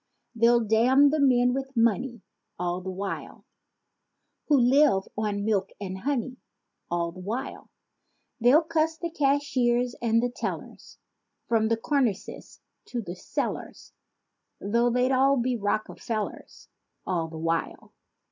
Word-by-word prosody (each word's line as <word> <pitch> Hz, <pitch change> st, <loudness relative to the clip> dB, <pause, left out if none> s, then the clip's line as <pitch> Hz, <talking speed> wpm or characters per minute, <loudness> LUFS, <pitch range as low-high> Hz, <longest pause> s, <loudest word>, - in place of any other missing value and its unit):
They'll 235 Hz, 0 st, +4 dB
damn 250 Hz, +6 st, +4 dB
the 310 Hz, -, 0 dB
men 250 Hz, -3 st, +4 dB
with 270 Hz, -1 st, -5 dB
money 235 Hz, 0 st, +1 dB, 0.3 s
All 175 Hz, +1 st, -2 dB
the 190 Hz, -, -6 dB
while 195 Hz, +1 st, -6 dB, 1.0 s
Who 295 Hz, -, +4 dB
"live 255 Hz, -4 st, +4 dB
on 205 Hz, -1 st, -2 dB
milk 200 Hz, -3 st, +1 dB
and 190 Hz, -2 st, -5 dB
honey" 260 Hz, 0 st, -2 dB, 0.5 s
All 170 Hz, -1 st, -1 dB
the 185 Hz, -, -12 dB
while. 215 Hz, +8 st, -5 dB, 0.7 s
They'll 255 Hz, +8 st, +5 dB
cuss 320 Hz, 0 st, 0 dB
the 340 Hz, 0 st, -4 dB
cashiers 265 Hz, -5 st, +1 dB
and 230 Hz, -1 st, +2 dB
the 245 Hz, -, 0 dB
tellers -, -, -6 dB, 0.5 s
From 225 Hz, -2 st, +2 dB
the 230 Hz, 0 st, +1 dB
cornices 240 Hz, -5 st, -2 dB, 0.2 s
to 240 Hz, -2 st, -4 dB
cellars. 180 Hz, -, -5 dB, 0.7 s
Though 235 Hz, +4 st, +1 dB
they'd 250 Hz, +2 st, +1 dB
all 270 Hz, +1 st, +4 dB
be 250 Hz, +1 st, 0 dB
Rockefellers— 215 Hz, 0 st, -4 dB, 0.4 s
All 170 Hz, -3 st, -1 dB
the 160 Hz, 0 st, -9 dB
while. 165 Hz, +1 st, -3 dB
235 Hz, 125 wpm, -26 LUFS, 205-265 Hz, 1.0 s, They'll